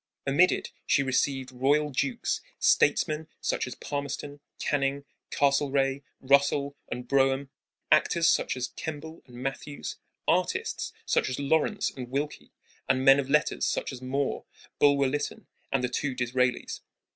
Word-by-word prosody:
Amid 145 +7 +5
it - - -3 0.2
she 140 - +3
received 130 0 0
royal 145 +4 +2
dukes, 235 - -1 0.2
statesmen 155 -1 +2
such - - -1
as 125 - -6
Palmerston, 145 0 -5 0.2
Canning, 140 -1 -1 0.2
Castlereagh, 140 -1 +2 0.2
Russell, 140 +1 +2
and 125 0 -5
Brougham, 135 +1 +2 0.4
actors 170 -1 +4
such 130 - +2
as 125 0 -2
Kemble 160 +1 -7
and 125 - -14
Matthews, 135 +3 -5 0.3
artists - - 0
such - - +1
as 130 - -3
Lawrence 160 +8 +1
and 125 -2 -8
Wilkie, 145 +3 -4 0.4
and 130 0 +2
men 135 0 +8
of 135 -1 -2
letters 150 +1 +2
such - - -2
as 125 - -8
Moore, 135 +2 -2 0.3
Bulwer 140 -1 +5
Lytton, 145 +2 -3 0.3
and 135 -2 +1
the - - +2
two 130 +2 -2
Disraelis. 125 0 0
140 Hz, 140 wpm, -28 LUFS, 130-145 Hz, 0.4 s, men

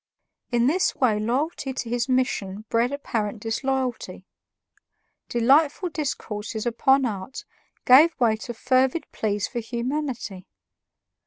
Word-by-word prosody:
In 240 -1 +2
this 345 +8 +2
way 230 -6 +2
loyalty 265 +5 -1
to 250 - -4
his 240 +2 -1
mission 215 -6 -1
bred 235 +2 +1
apparent 225 -7 -3
disloyalty. 240 -4 -3 1.0
Delightful 285 +9 +3
discourses 220 -8 -4
upon 265 +3 +3
art 205 +2 -5 0.4
gave 295 +7 +6
way 230 -3 +3
to 235 +2 -7
fervid 260 +6 +1
pleas 205 -2 -1
for 240 - -4
humanity. 235 -4 -4
245 Hz, 110 wpm, -24 LUFS, 220-270 Hz, 1.0 s, gave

